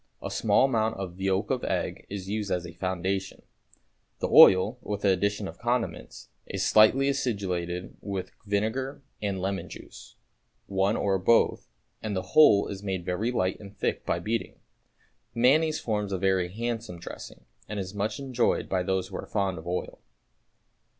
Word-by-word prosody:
A - - -6
small - - +3
amount 115 -4 0
of 95 -1 -6
yolk 95 +3 0
of 130 -2 -1
egg - - -2
is 95 -2 -6
used 105 0 -2
as 90 -2 -1
a 90 - -9
foundation. 95 +1 -3 0.7
The - - -2
oil, 100 +6 +7
with 105 -1 -4
the 100 - +4
addition 100 +2 0
of - - -10
condiments, 120 0 -3 0.2
is - - -2
slightly 120 +6 +5
acidulated 95 -10 -2
with 100 -2 -4 0.2
vinegar 120 +7 -1 0.2
and 100 -2 -2
lemon 95 +1 -3
juice, - - -12 0.5
one 95 +2 +1
or 95 -1 +1
both, 115 +5 +3 0.3
and 105 -2 -3
the 95 -1 -4
whole 110 -10 +7
is 100 -1 -6
made 95 -3 -3
very 95 +6 -1
light 95 -6 0
and 100 -1 -12
thick - - -1
by - - 0
beating. 115 +1 -3 0.8
Mayonnaise 150 +7 +3
forms 105 -3 -2
a 95 - 0
very 95 -1 +1
handsome 115 -3 -4
dressing, 85 - -10 0.2
and 105 - -4
it - - -1
is 90 - -9
much 105 +1 -2
enjoyed 130 -3 0
by 95 -1 0
those 95 0 -1
who 95 - -6
are - - -7
fond 95 -4 -1
of 80 - -11
oil. 90 +1 -3
100 Hz, 170 wpm, -27 LUFS, 95-115 Hz, 0.8 s, oil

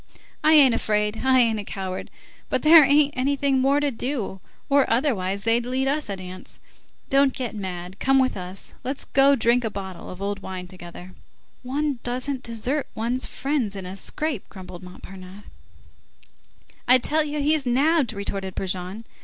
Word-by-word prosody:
I 310 - +5
ain't 280 -5 +7
afraid, 210 0 0
I 260 -1 +5
ain't 225 -2 +2
a - - -4
coward, 190 -2 -5 0.4
but - - 0
there 315 0 +9
ain't 285 +1 +4
anything 275 +1 +1
more 275 +2 +3
to 290 -1 0
do, 235 -5 -4 0.3
or 280 -1 +3
otherwise 200 -7 0
they'd 230 +1 +2
lead 260 +2 -1
us 290 -2 -1
a 200 - -2
dance. 185 0 -7 0.5
Don't 275 -1 +4
get 250 -3 -4
mad, 185 -2 -6
come 270 0 +3
with 260 -1 +2
us, 185 +1 -5
let's 265 +2 -4
go 275 +1 +4
drink 235 0 +2
a 225 - -1
bottle 190 -3 -7
of 185 - -9
old 200 0 -3
wine 185 -1 -7
together." 180 0 -11 0.5
"One 275 +1 -2
doesn't 255 +2 -2
desert 245 +5 -2
one's 240 +3 -1
friends 270 -7 -2
in 190 -2 -6
a 185 +1 -6
scrape," 280 +4 -4
grumbled 185 -3 -10
Montparnasse. 185 +2 -11 1.4
"I 255 - +8
tell 305 +5 +1
you 300 0 -4
he's 295 -1 +1
nabbed!" 280 +2 +2
retorted 195 -2 -5
Brujon. 190 +3 -3
240 Hz, 165 wpm, -24 LUFS, 195-275 Hz, 1.4 s, there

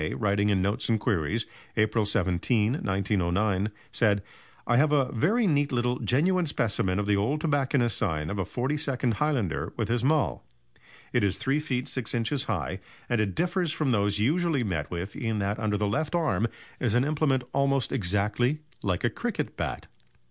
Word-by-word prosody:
writing 100 -1 +1
in 95 -2 +2
Notes 100 +4 0
and 110 -1 +2
Queries, 105 +3 0 0.3
April 110 0 +2
17, 105 +2 +1
1909, 100 - 0 0.2
said: 105 -4 +2 0.4
"I 120 - +3
have 150 +3 +4
a 140 -3 +2
very 205 - +2
neat 145 -5 +2
little, 125 0 0
genuine 175 +7 +2
specimen 100 -8 +1
of 105 - 0
the 105 0 +2
old 110 +10 0
tobacconist's 140 -6 +2
sign 75 -3 -1
of 100 - -3
a - - +1
42nd 130 - -1
Highlander 105 - -1
with 110 -2 -1
his 120 0 0
'mull.' 150 +1 +1 0.7
It - - +2
is 100 -1 +2
3 135 +8 0
ft. 130 -4 -2
6 130 -4 -2
in. 115 -1 0 0.2
high, - - -2 0.3
and 120 -2 +2
it 100 -3 -2
differs 175 -1 0
from 150 -4 0
those 105 -2 +1
usually 150 +4 +1
met 80 -8 -2
with 90 +3 -5
in 115 -6 -2
that 100 +1 -1
under 105 -2 0
the 105 - 0
left 145 +10 -1
arm 155 -9 +1 0.3
is 120 -3 +1
an 125 - +4
implement 145 -3 +1
almost 140 -1 +1
exactly 105 - 0 0.2
like 95 -4 -1
a - - +3
cricket - - -3
bat. - - -4
115 Hz, 175 wpm, -27 LUFS, 100-140 Hz, 0.7 s, have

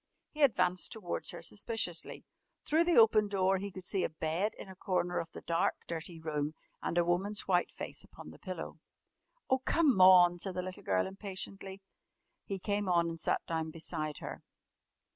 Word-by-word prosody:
He 305 - -6
advanced 185 -9 +3
towards 200 -6 -3
her - - -4
suspiciously. 205 -5 -2 0.4
Through 320 +3 +3
the 345 - +3
open 220 -2 +6
door 195 -1 +2
he 200 +1 -4
could 185 0 -9
see 190 -1 0
a - - 0
bed 160 +6 -1
in - - -9
a 190 - -10
corner 180 -1 -1
of 165 - -5
the - - -9
dark, 170 +1 +1
dirty 165 0 -5
room 155 -1 -2 0.3
and 170 - -2
a 175 - +4
woman's 190 +4 +1
white 180 -2 +2
face - - -6
upon 75 - -12
the 80 - -15
pillow. 175 -3 -6 0.7
"Oh, 260 - +3
come 265 - +3
on!" 180 -1 +8
said 190 0 -3
the 180 - -2
little 185 0 -7
girl 95 -1 +1
impatiently. 195 0 -6 0.6
He 195 - -3
came 205 +1 -1
on 170 -1 +3
and 165 0 -6
sat - - 0
down 160 -1 -2
beside 155 -2 -4
her. - - -7
185 Hz, 180 wpm, -32 LUFS, 170-200 Hz, 0.7 s, on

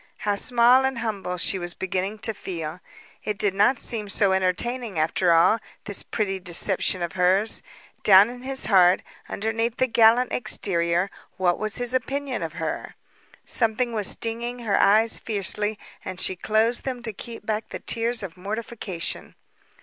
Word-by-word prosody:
How 205 - -1
small 245 +4 +4
and 265 -1 -1
humble 200 -6 -4
she 190 +2 +1
was 175 -1 -5
beginning 190 +3 -3
to 220 - -1
feel. 170 -4 -6 0.4
It 210 -1 -3
did 205 -2 0
not 210 +7 +3
seem 215 -4 -2
so 200 -1 +2
entertaining, 190 +4 -1
after 165 +3 +1
all, 170 +7 +4 0.2
this 205 -2 -2
pretty 195 -3 -3
deception 180 0 +2
of 170 - -4
hers. 190 +4 +1 0.4
Down 195 0 +7
in 245 0 -11
his 265 +1 -1
heart, 185 -3 +4 0.3
underneath 225 +2 -2
the 260 - +3
gallant 235 +1 +4
exterior, 180 -5 0 0.3
what 180 -2 +1
was 215 0 -2
his 245 0 -3
opinion 270 +2 -2
of - - -5
her? - - -5 0.5
Something 235 +1 +3
was 210 -3 +1
stinging 235 +2 0
her 205 - +1
eyes 220 +3 +4
fiercely, 210 0 +1 0.3
and 185 0 -6
she 190 - +1
closed 220 +5 +1
them 255 -3 -5
to 225 -2 -4
keep 230 +1 -9
back 215 0 -2
the - - -5
tears 230 0 -1
of 175 -4 -7
mortification. 200 -2 -5
210 Hz, 160 wpm, -24 LUFS, 190-235 Hz, 0.5 s, Down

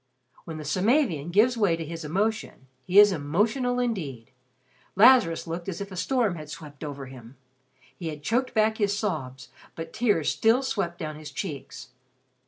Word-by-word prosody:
When 160 -1 -6
the 155 - -7
Samavian 185 - +1
gives 220 +7 +4
way 200 -7 +3
to 165 0 -6
his 165 +1 -7
emotions, 200 +1 -2 0.2
he 185 - +1
is 205 0 +9
emotional 215 - 0
indeed. 160 - -3 0.6
Lazarus 215 -5 +5
looked 170 +2 -5
as 175 - -5
if 200 0 -6
a - - -7
storm 220 -1 0
had 155 -1 -9
swept 150 -2 -10
over 140 -2 -6
him. 130 -1 -13 0.6
He 170 - -5
had 150 -2 -6
choked 245 - 0
back 220 0 +2
his 205 -1 +1
sobs, 135 - -4 0.3
but 165 - -7
tears 210 -10 +1
still 230 +4 +3
swept 190 -9 -2
down 155 -1 -5
his 155 -1 -9
cheeks. 145 -7 -7
175 Hz, 170 wpm, -26 LUFS, 150-220 Hz, 0.6 s, is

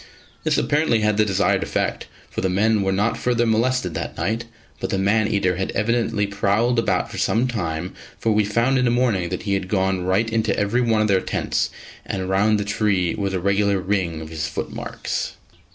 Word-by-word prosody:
This - - +1
apparently 145 -7 +2
had 105 -1 +2
the 110 - +4
desired 100 -1 +2
effect, - - -2 0.2
for - - -3
the 95 - +1
men 105 +3 +2
were 95 0 +1
not 105 +4 0
further 120 -1 +1
molested 115 -4 +1
that - - -5
night; 115 +3 -1 0.3
but - - -3
the 95 - 0
man 105 +3 +2
eater 95 -4 +1
had 95 - -2
evidently 115 -1 +1
prowled 100 +4 +1
about - - 0
for - - -5
some 120 +3 +2
time, 85 -7 -3 0.2
for 115 - 0
we 105 0 +3
found 115 +6 +1
in 125 - +2
the - - +3
morning 120 -8 +1
that 90 - -4
he 100 -2 -1
had 95 -1 -1
gone 95 -2 0
right 95 +5 +1
into 110 -2 +1
every 105 +5 +1
one 110 -3 +2
of - - +1
their 95 -2 +3
tents, - - -1 0.3
and 95 -1 -4
round 105 +3 +3
the 100 - -2
tree 100 -4 +1
was 100 -2 -2
a - - 0
regular 100 +1 +2
ring 90 -4 -1
of 80 - -8
his 80 -1 -3
footmarks. 75 - -4
105 Hz, 205 wpm, -22 LUFS, 95-115 Hz, 0.3 s, the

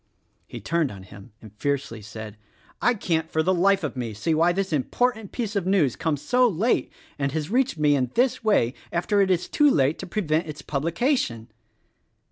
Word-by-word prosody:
He - - -8
turned 165 -4 0
on 95 -2 -10
him 100 +3 -13
and 105 -2 -13
fiercely 140 -6 -2
said, 105 0 -9 0.5
"I 245 - +3
can't 160 -5 -1
for 160 - 0
the 185 +3 +2
life 195 +1 +3
of 150 - -3
me 120 -4 -4
see 160 +10 0
why 165 +3 +3
this 190 -1 -2
important 220 - 0
piece 225 -4 -4
of 190 -3 -1
news 170 - +2
comes 155 -4 -2
so 250 0 +3
late, 215 +4 0 0.3
and 140 -1 0
has 155 +3 -3
reached 255 -5 +1
me 150 -1 +3
in 130 -3 0
this 250 +1 +1
way 170 - +2 0.2
after 190 +4 +1
it 195 - +2
is 180 -1 +1
too 295 -1 +4
late 140 - +2
to - - -6
prevent 170 -4 -1
its 150 -1 -8
publication." 155 - -1
165 Hz, 195 wpm, -24 LUFS, 135-200 Hz, 0.5 s, too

